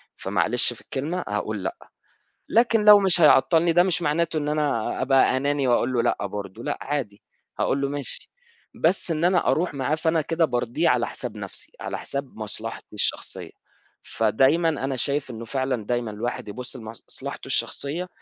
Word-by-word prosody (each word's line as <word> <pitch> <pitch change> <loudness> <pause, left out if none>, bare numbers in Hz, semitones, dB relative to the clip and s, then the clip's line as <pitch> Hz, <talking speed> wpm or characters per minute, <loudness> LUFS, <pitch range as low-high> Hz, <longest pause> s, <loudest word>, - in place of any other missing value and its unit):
فمعلش - - +1
في - - -14
الكلمة 160 +7 -3
هاقول 105 -1 -3
لأ، - - -3 0.7
لكن 230 -1 +3
لو 210 -1 +10
مش 190 -3 +3
هيعطّلني 165 +3 +5
ده 175 +2 +5
مش 180 -1 +2
معناته 165 +2 0
إن 150 -1 -2
أنا 145 -8 -1
أبقى 130 0 +4
أناني 140 0 0
وأقول 120 +1 +2
له 120 -2 +2
لأ 100 - 0
برضه، 100 +2 -7
لأ - - -2
عادي 130 -8 -4 0.4
هاقول 140 - +1
له 140 - +1
ماشي، 145 -1 -5 0.4
بس 175 +2 +2
إن 160 +1 0
أنا 180 0 +3
أروح 170 -2 +1
معاه 140 +2 0
فأنا 160 +1 +1
كده 165 +2 +1
بارضيه 120 -5 0
على - - +2
حساب - - -6
نفْسي، - - -7
على - - -4
حساب 140 -1 -4
مصلحتي 110 +1 -5
الشخصية، 105 - -2 0.5
فدايمًا 135 +10 +2
أنا 135 -3 -2
شايف 140 +2 0
إنه 115 0 -7
فعلًا 130 -2 -2
دايمًا 120 -1 -1
الواحد 110 +1 -4
يبُصّ 125 +5 -5
لمصلحته 110 -2 -7
الشخصية 165 +6 -1
140 Hz, 165 wpm, -24 LUFS, 120-165 Hz, 0.7 s, لو